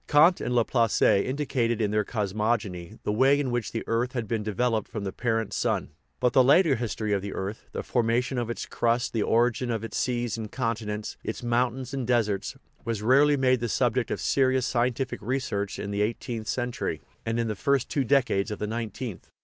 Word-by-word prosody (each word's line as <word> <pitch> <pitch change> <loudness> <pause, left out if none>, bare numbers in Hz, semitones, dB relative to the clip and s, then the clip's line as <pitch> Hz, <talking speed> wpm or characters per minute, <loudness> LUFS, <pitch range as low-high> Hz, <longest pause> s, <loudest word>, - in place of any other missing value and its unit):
Kant 160 +4 +5
and 125 - -1
Laplace 115 -1 +2
indicated,, 120 0 +2
in 105 -2 +1
their 105 0 +2
cosmogony, 105 -3 -2
the - - 0
way 135 +6 +4
in 135 -3 -1
which 120 -2 -2
the 115 - -3
earth 120 +2 0
had 120 -4 -3
been 110 +1 -1
developed 110 +1 0
from 105 - -5
the 95 - -3
parent 115 -2 -1
sun. - - -1 0.3
But 125 -1 +2
the 130 - +6
later 145 +3 +5
history 110 -3 -2
of 100 - +1
the 100 0 -5
earth, 100 +3 -5
the - - -4
formation 120 +2 0
of 120 -1 -3
its 120 - -4
crust, 120 +1 0
the 115 - 0
origin 120 +3 +2
of 115 -2 -2
its 115 - -4
seas 120 -3 -1
and 110 -2 -6
continents, 110 -4 -3
its 110 - -5
mountains 125 +2 0
and 130 -4 -2
deserts, 110 -5 0 0.3
was 115 -3 -3
rarely 140 +5 +5
made 130 -1 +3
the 120 0 -2
subject 125 +1 +1
of - - -2
serious 130 -1 +2
scien 120 0 +2
tific 130 0 -3
research 105 -4 -2
in 100 - -4
the 100 0 -1
eighteenth 110 +1 -2
century, 120 +1 -2 0.2
and 115 +1 -1
in 115 - 0
the 110 - -2
first 140 +3 +1
two 140 - 0
decades 120 -5 +2
of 105 - -4
the - - -3
nineteenth. 115 -1 -5
120 Hz, 205 wpm, -27 LUFS, 110-125 Hz, 0.3 s, the